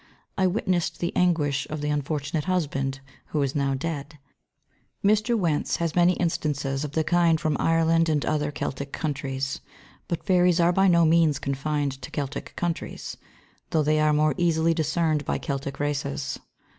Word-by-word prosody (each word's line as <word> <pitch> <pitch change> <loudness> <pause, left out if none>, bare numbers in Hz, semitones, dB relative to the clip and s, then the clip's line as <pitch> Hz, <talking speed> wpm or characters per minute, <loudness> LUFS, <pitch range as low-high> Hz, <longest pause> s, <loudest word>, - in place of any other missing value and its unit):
I 190 - +2
witnessed 185 -2 -1
the 170 - -2
anguish 150 -6 +1
of 155 - -4
the 150 0 -1
unfortunate 145 +1 -2
husband, 140 -7 -1 0.3
who 150 - -1
is 135 -1 -1
now 140 -2 0
dead. 150 +1 -5 0.9
Mr. 215 +3 +3
Wentz 165 -7 0
has 165 -2 -1
many 175 0 +4
instances 145 -5 -1
of 150 -1 -5
the 160 - +1
kind 170 -1 +3
from 155 -1 0
Ireland 165 0 +3
and 150 -2 +1
other 150 -1 0
Celtic 140 -1 -4
countries; 135 -3 -3 0.5
but 170 - -3
fairies 180 -1 +4
are 175 +1 +4
by 195 +2 +4
no 170 -2 +5
means 160 -3 +4
confined 140 0 -2
to 125 - -7
Celtic 140 -1 -5
countries, 175 -1 -4 0.5
though 155 -2 +2
they 155 +1 +2
are 155 0 +3
more 150 0 +3
easily 165 -1 +2
discerned 160 -1 0
by - - -1
Celtic 140 -1 -4
races. 145 -1 -2
155 Hz, 160 wpm, -25 LUFS, 140-170 Hz, 0.9 s, no